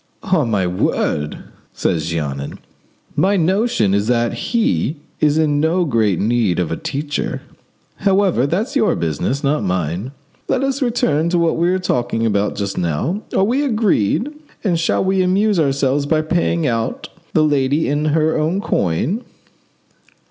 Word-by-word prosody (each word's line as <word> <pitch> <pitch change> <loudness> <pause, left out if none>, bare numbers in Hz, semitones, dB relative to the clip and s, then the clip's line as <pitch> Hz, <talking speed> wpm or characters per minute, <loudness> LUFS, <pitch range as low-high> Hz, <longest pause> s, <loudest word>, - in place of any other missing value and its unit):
"On 180 - +1
my 100 -4 +1
word," 75 -4 -1 0.3
said 85 - 0
Jeannin, 75 -3 -3 0.6
"my 195 +2 +2
notion 185 - +2
is 100 +1 +1
that 120 -1 +1
he 155 - 0 0.2
is 150 0 +3
in 150 -2 +2
no 170 +4 +2
great 110 - +1
need 110 -4 +1
of 90 -3 -1
a - - 0
teacher; 145 - -3 0.5
however, 190 - +2
that's 210 - -2
your 240 -6 +3
business, 85 - -2
not 140 -3 +1
mine. 90 - -2 0.4
Let 260 - 0
us 275 +1 -1
return 170 - +1
to 175 - +1
what 170 -1 +2
we 170 +2 +1
were 185 - +2
talking 120 -9 -1
about 105 -2 0
just 100 -1 -3
now. 90 - -1 0.2
Are - - +4
we 250 +8 +1
agreed; 220 - +1 0.3
and 175 -6 +1
shall 165 - +1
we 190 0 +2
amuse 195 +2 +2
ourselves 140 -1 +1
by 155 0 +2
paying 170 0 0
out 115 -4 -2 0.2
the 155 - +4
lady 145 0 +1
in, 145 +2 0
her 155 +1 +2
own 160 +5 0
coin?" 170 - -1
150 Hz, 155 wpm, -19 LUFS, -, 0.6 s, Are